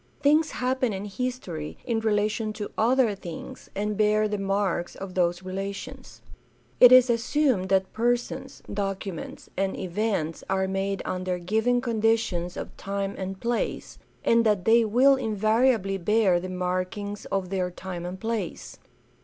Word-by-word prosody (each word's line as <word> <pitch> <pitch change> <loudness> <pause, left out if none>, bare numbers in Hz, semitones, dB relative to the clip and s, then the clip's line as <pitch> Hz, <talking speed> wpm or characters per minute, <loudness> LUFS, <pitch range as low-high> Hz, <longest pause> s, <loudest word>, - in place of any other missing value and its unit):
Things 305 +2 +4
happen 255 -2 0
in 195 +1 -4
history 200 -8 -4
in 230 -3 0
rela 210 -1 +2
tion 215 0 -3
to 210 -1 -6
other 240 -1 +3
things 175 -4 -9
and 210 +1 -1
bear 215 +1 +3
the 210 -1 -2
marks 195 -3 -1
of 195 -1 -7
those 175 0 +1
relations. 200 +8 -6 0.6
It 250 - +10
is 255 0 +8
assumed 235 -4 +1
that 190 -1 +1
persons, 240 +2 -1
documents, 195 -3 -4
and 195 0 -1
events 185 -3 -2
are 190 0 +1
made 195 0 -2
under 185 -1 -2
given 220 +7 +1
conditions 225 -7 0
of - - -6
time 200 0 -3
and 190 0 -5
place, 235 0 -2 0.3
and 230 0 +4
that 210 -5 +1
they 230 +1 +6
will 255 +6 +5
invariably 215 -2 +1
bear 195 -1 +3
the 185 +1 -6
markings 185 +3 -3
of 195 -2 -2
their 185 -2 0
time 180 -1 -7
and 180 +1 -6
place. 220 -5 -4
205 Hz, 145 wpm, -26 LUFS, 185-230 Hz, 0.6 s, It